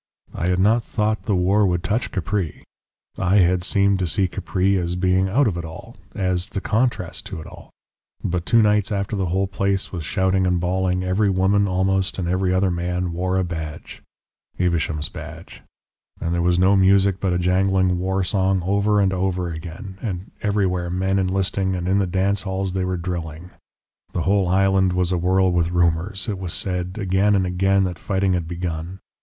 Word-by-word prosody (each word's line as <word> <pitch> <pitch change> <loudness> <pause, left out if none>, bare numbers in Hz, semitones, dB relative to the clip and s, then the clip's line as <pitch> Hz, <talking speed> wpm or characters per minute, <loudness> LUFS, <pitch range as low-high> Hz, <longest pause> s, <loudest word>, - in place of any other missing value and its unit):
I 85 - -2
had 90 0 +2
not 110 +5 +3
thought 110 0 -1
the 105 - +1
war 95 +3 +3
would 90 -1 -1
touch 105 +6 -1
Capri 95 -2 -3 0.6
I 95 +1 +2
had 90 -2 +3
seemed 100 0 +2
to 90 - 0
see 95 +4 +1
Capri 95 +2 0
as 90 -1 -1
being 95 +1 +1
out 130 +7 +3
of 90 -5 -1
it - - -5
all, 80 0 -10 0.2
as 90 -1 -1
the 100 - -4
contrast 110 -5 -1
to 90 - -6
it 80 - -9
all; - - -13 0.5
but 90 -1 -1
two 115 -1 +5
nights 105 0 +2
after 100 +1 -2
the 95 -2 -1
whole 95 +3 0
place 100 0 -1
was 85 -4 -5
shouting 95 +2 +1
and 90 -1 +1
bawling, 90 +1 0
every 95 +3 +1
woman 100 +2 +2
almost 95 0 0
and 90 -3 -2
every 90 +1 +1
other 95 0 +2
man 90 +1 -2
wore 90 +2 -1
a 95 - +2
badge 80 -3 -6 0.6
Evesham's 85 -4 0
badge - - -10 0.6
and 85 +1 -2
there 85 - 0
was 90 0 +2
no 95 +2 +4
music 95 0 +4
but 95 -2 0
a 90 - +1
jangling 95 0 +2
war 95 +1 0
song 95 0 +1
over 100 +2 +2
and 95 -1 +2
over 90 -1 -1
again, 85 +4 -8
and 95 -3 -5
everywhere 95 -4 0
men 95 +2 0
enlisting, 95 0 0
and 90 -1 -3
in 95 +2 +2
the 95 - +1
dancing 95 +3 0
halls 95 -1 -2
they 95 -1 -1
were 90 0 -1
drilling. 85 -1 -5 0.6
The 85 - -1
whole 100 -1 +2
island 95 0 +3
was 90 0 0
awhirl 90 +1 +2
with 85 -1 +1
rumours; 90 +4 0
it 100 -4 -3
was 90 -3 -4
said, 90 0 -3
again 100 +1 +2
and 95 -1 +2
again, 95 +2 +2
that 90 -2 -3
fighting 95 -1 0
had 85 -2 -1
begun. 85 +1 -5
95 Hz, 190 wpm, -22 LUFS, 90-95 Hz, 0.6 s, two